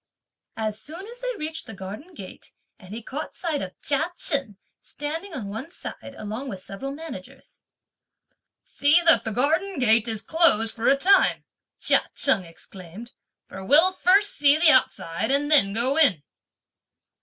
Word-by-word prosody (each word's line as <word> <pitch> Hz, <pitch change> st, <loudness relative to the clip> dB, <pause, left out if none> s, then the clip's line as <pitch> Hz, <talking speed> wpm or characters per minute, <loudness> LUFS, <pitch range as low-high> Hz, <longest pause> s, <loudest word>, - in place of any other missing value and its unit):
As 215 Hz, -1 st, -4 dB
soon 325 Hz, -, -9 dB
as 485 Hz, +1 st, -9 dB
they -, -, -4 dB
reached 315 Hz, +1 st, -6 dB
the 220 Hz, -, -9 dB
garden 210 Hz, -, -10 dB
gate, 190 Hz, -8 st, -12 dB, 0.3 s
and 185 Hz, -, -15 dB
he 225 Hz, +2 st, -7 dB
caught 295 Hz, +7 st, -7 dB
sight 320 Hz, -5 st, -3 dB
of 185 Hz, -1 st, -8 dB
Chia 315 Hz, +4 st, 0 dB
Chen, 275 Hz, -, 0 dB, 0.2 s
standing 325 Hz, +7 st, -6 dB
on 255 Hz, -10 st, -6 dB
one 225 Hz, +10 st, -7 dB
side, 280 Hz, -5 st, -9 dB
along 220 Hz, +6 st, -6 dB
with 195 Hz, -, -7 dB
several 200 Hz, +9 st, -7 dB
managers: 320 Hz, +3 st, -11 dB, 1.0 s
"See 290 Hz, +4 st, +2 dB
that 330 Hz, -, +4 dB
the 225 Hz, -, -2 dB
garden 320 Hz, -, -1 dB
gate 225 Hz, -3 st, +3 dB
is 220 Hz, -2 st, -2 dB
closed 270 Hz, -10 st, +2 dB
for 230 Hz, 0 st, -2 dB
a 275 Hz, -, +4 dB
time," 385 Hz, +7 st, +3 dB, 0.4 s
Chia -, -, +4 dB
Cheng 220 Hz, -10 st, +2 dB
exclaimed, 185 Hz, +6 st, -12 dB, 0.3 s
"for 190 Hz, -, -10 dB
we'll 310 Hz, -, +5 dB
first 390 Hz, +3 st, +3 dB
see 290 Hz, 0 st, +3 dB
the 320 Hz, -1 st, +6 dB
outside 220 Hz, -, 0 dB
and 285 Hz, +2 st, 0 dB
then 235 Hz, -10 st, +6 dB
go 245 Hz, +7 st, -1 dB
in." 225 Hz, -, +3 dB
275 Hz, 160 wpm, -24 LUFS, 215-320 Hz, 1.0 s, the